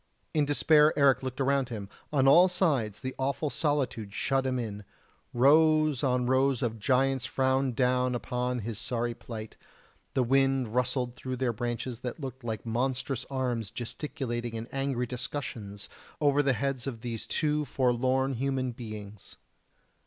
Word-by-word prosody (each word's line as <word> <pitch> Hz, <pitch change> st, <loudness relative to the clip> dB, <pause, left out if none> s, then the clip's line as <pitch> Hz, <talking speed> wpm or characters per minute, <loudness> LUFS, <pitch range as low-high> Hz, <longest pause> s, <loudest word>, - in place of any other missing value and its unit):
In 150 Hz, -2 st, +3 dB
despair 150 Hz, +1 st, +4 dB
Eric 140 Hz, -2 st, +5 dB
looked 130 Hz, 0 st, -5 dB
around 135 Hz, -1 st, +1 dB
him 105 Hz, -4 st, -5 dB, 0.2 s
on 135 Hz, -3 st, +3 dB
all 175 Hz, +7 st, +8 dB
sides 140 Hz, -, 0 dB
the 130 Hz, 0 st, -4 dB
awful 140 Hz, +2 st, -1 dB
solitude 130 Hz, -8 st, -1 dB
shut 135 Hz, -1 st, +1 dB
him 130 Hz, -1 st, 0 dB
in; 105 Hz, -4 st, -4 dB, 0.5 s
rows 155 Hz, +2 st, +4 dB
on 125 Hz, -2 st, +2 dB
rows 130 Hz, 0 st, +2 dB
of 115 Hz, -2 st, -2 dB
giants 135 Hz, +2 st, +2 dB
frowned 130 Hz, -1 st, +1 dB
down 125 Hz, 0 st, +2 dB
upon 125 Hz, +2 st, -2 dB
his 110 Hz, 0 st, -5 dB
sorry 120 Hz, -1 st, -2 dB
plight, 110 Hz, -2 st, -8 dB, 0.6 s
the 130 Hz, -, +3 dB
wind 135 Hz, -2 st, +2 dB
rustled 125 Hz, 0 st, 0 dB
through 130 Hz, +1 st, -5 dB
their 125 Hz, -2 st, 0 dB
branches 120 Hz, +1 st, -3 dB
that 125 Hz, +4 st, -5 dB
looked 130 Hz, -2 st, -7 dB
like 110 Hz, -1 st, -4 dB
monstrous 125 Hz, +2 st, -1 dB
arms 125 Hz, -6 st, -2 dB
gesticulating 120 Hz, -1 st, -4 dB
in 115 Hz, +1 st, -5 dB
angry 135 Hz, -2 st, -1 dB
discussions 120 Hz, -5 st, -5 dB, 0.3 s
over 145 Hz, -1 st, +4 dB
the 135 Hz, -2 st, +2 dB
heads 135 Hz, 0 st, -2 dB
of 115 Hz, -5 st, -5 dB
these 115 Hz, -2 st, -5 dB
two 150 Hz, -1 st, +1 dB
forlorn 130 Hz, 0 st, +1 dB
human 130 Hz, 0 st, -1 dB
beings. 105 Hz, -4 st, -8 dB
130 Hz, 150 wpm, -29 LUFS, 120-135 Hz, 0.6 s, all